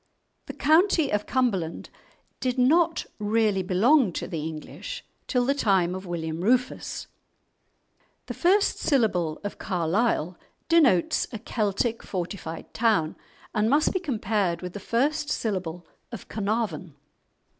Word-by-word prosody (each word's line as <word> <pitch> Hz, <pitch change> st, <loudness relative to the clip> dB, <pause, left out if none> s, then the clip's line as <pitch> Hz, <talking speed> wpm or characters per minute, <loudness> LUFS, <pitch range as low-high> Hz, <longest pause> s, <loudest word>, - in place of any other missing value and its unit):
The -, -, -6 dB
county 320 Hz, 0 st, +3 dB
of 210 Hz, 0 st, -1 dB
Cumberland 195 Hz, -11 st, -1 dB, 0.5 s
did 255 Hz, 0 st, -1 dB
not 320 Hz, +6 st, +3 dB
really 210 Hz, -2 st, +2 dB
belong 210 Hz, -, +3 dB
to -, -, -4 dB
the 170 Hz, -4 st, -4 dB
English 160 Hz, -, -7 dB, 0.2 s
till 250 Hz, -2 st, +1 dB
the 275 Hz, -, +3 dB
time 190 Hz, -9 st, +2 dB
of 185 Hz, 0 st, -6 dB
William 165 Hz, -1 st, -3 dB
Rufus. 250 Hz, +4 st, 0 dB, 1.2 s
The -, -, -5 dB
first 390 Hz, +4 st, +2 dB
syllable 185 Hz, -, +1 dB
of 205 Hz, -, -5 dB
"Carlisle" 180 Hz, 0 st, 0 dB, 0.3 s
denotes 285 Hz, -, +3 dB
a 225 Hz, -, -4 dB
Celtic 220 Hz, +1 st, -1 dB
fortified 175 Hz, -3 st, -6 dB
town, 215 Hz, -9 st, +2 dB, 0.4 s
and 215 Hz, 0 st, +2 dB
must 290 Hz, +4 st, +3 dB
be 375 Hz, -, +1 dB
compared 215 Hz, -, -1 dB
with 180 Hz, -1 st, -5 dB
the 205 Hz, -, -6 dB
first 295 Hz, +9 st, 0 dB
syllable 180 Hz, -5 st, -3 dB, 0.3 s
of -, -, -8 dB
"Carnarvon." 200 Hz, -7 st, -2 dB
215 Hz, 125 wpm, -26 LUFS, 180-255 Hz, 1.2 s, county